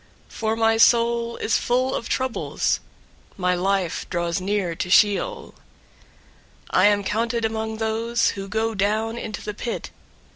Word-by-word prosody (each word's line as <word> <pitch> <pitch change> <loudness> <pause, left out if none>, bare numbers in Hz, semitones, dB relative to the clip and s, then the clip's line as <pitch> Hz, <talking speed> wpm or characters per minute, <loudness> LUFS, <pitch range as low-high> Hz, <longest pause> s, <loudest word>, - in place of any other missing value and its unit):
088:003 - - -18
For 220 0 0
my 225 0 +3
soul 235 0 +3
is 220 - +1
full 255 +2 +1
of 230 - -4
troubles. 260 -2 -1 0.6
My 180 -1 +1
life 185 -1 -1
draws 170 0 -1
near 195 -2 -1
to 180 +2 -4
Sheol. 340 - +2 1.2
088:004 - - +3
I 185 - +6
am 205 -1 +2
counted 230 +3 -1
among 220 0 -3
those 230 +1 0
who 195 0 -5
go 220 +3 -1
down 215 +3 0
into 215 -3 -6
the 210 - -4
pit. 230 +3 -5
220 Hz, 150 wpm, -23 LUFS, 200-230 Hz, 1.2 s, I